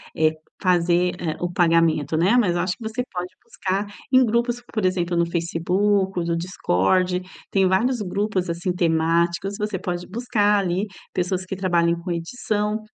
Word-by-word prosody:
eh, 155 0 +3 0.3
fazer, 180 -1 +2
eh, 160 -3 -3
o 175 0 -1
pagamento, 165 -4 +2
né? 190 +9 +4
Mas 185 -8 +3
eu 175 - +1
acho 180 0 -2
que 240 - -11
você 225 +3 -2
pode 180 0 -5
buscar 195 +2 -2 0.3
em 260 0 +6
grupos. 235 +2 0
Por 215 -4 0
exemplo, 175 -2 0
no 170 - +3
Facebook, 180 +3 0
no 170 0 0
Discord. 180 - +1 0.3
Tem 195 -1 +3
vários 230 +6 +1
grupos, 195 -1 -1
assim, 170 +2 -1
temáticos. 170 +2 +1
Você 210 -3 -2
pode 175 0 -4
buscar 210 -2 +1
ali 190 +2 -1 0.3
pessoas 185 +1 -1
que 190 - -4
trabalhem 170 -3 +2
com 180 +1 -5
edição, 210 +4 -2
180 Hz, 160 wpm, -23 LUFS, 170-205 Hz, 0.3 s, em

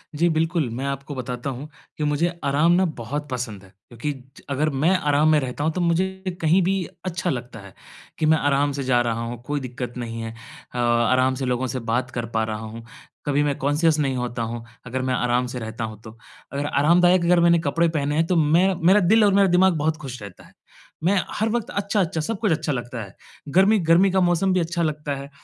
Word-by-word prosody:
जी, 170 +3 +2
बिल्कुल, 160 -3 0
मैं 125 +4 -4
आपको 140 +1 -4
बताता 125 +1 -4
हूँ 135 +3 -6 0.3
कि 150 - -2
मुझे 150 +3 +1 0.2
आराम 145 +4 +3
ना 185 +2 +4
बहुत 145 +6 -5
पसंद 115 -6 -4
है, 95 - -16 0.2
क्योंकि 125 +5 -4 0.3
ज - - -13
अगर 150 +3 +1
मैं 145 +3 +1
आराम 150 -2 +2
में 155 - +5
रहता 130 +1 -4
हूँ 160 - +1
तो 180 - -2
मुझे 185 +2 -1
कहीं 165 +4 +4
भी 190 +3 +1 0.3
अच्छा 180 0 -2
लगता 125 -4 -5
है, 100 -1 -13 0.5
कि 155 - +1
मैं 160 +1 +5
आराम 145 0 +1
से 140 0 -4
जा 125 -2 +2
रहा 115 -1 -1
हूँ, 120 0 -6
कोई 145 +2 -2
दिक्कत 125 -2 -6
नहीं 115 -1 -5
है। 115 0 -5
अ, 115 +1 -13
आराम 120 +2 +2
से 135 - -3
लोगों 125 +1 -1
से 130 +2 -3
बात 125 +3 0
कर 120 -2 -3
पा 110 - +2
रहा 110 -1 -3
हूँ, 110 +1 -8 0.4
कभी 145 0 +2
मैं 145 -2 0
कॉन्शियस 150 +3 +2
नहीं 135 -3 0
होता 120 -1 -3
हूँ, 115 +1 -5 0.2
अगर 130 +1 -3
मैं 130 0 -1
आराम 125 0 +1
से 125 0 -5
रहता 110 0 -5
हूँ 110 -1 -6
तो। 110 +1 -12 0.3
अगर 140 +1 -2
आरामदायक 170 +5 +4
अगर 175 0 +4
मैंने 170 0 +5
कपड़े 165 +2 +1
पहने 150 -2 -1
हैं 160 +2 +2
तो 180 - +1
मैं 170 +5 +3
मेरा 195 +3 +6
दिल 210 +4 +4
और 200 - +4
मेरा 195 0 +5
दिमाग़ 180 +1 +4
बहुत 155 +1 0
खुश 130 -6 -8
रहता 100 -2 -11
है। - - -20 0.5
मैं 190 +4 +3 0.2
हर 220 +1 0
वक़्त 235 -1 -2
अच्छा-अच्छा 195 -5 -1
सब 195 +6 -3
कुछ 210 -5 +1
अच्छा 155 -1 0
लगता 120 -2 -4
है। 100 -1 -13 0.4
गर्मी 195 +4 +5
गर्मी 180 +3 +5
का 190 - +2
मौसम 175 +2 +2
भी 185 - +2
अच्छा 170 0 -1
लगता 150 -2 -2
है, 140 +1 -8
145 Hz, 230 wpm, -23 LUFS, 125-170 Hz, 0.5 s, मेरा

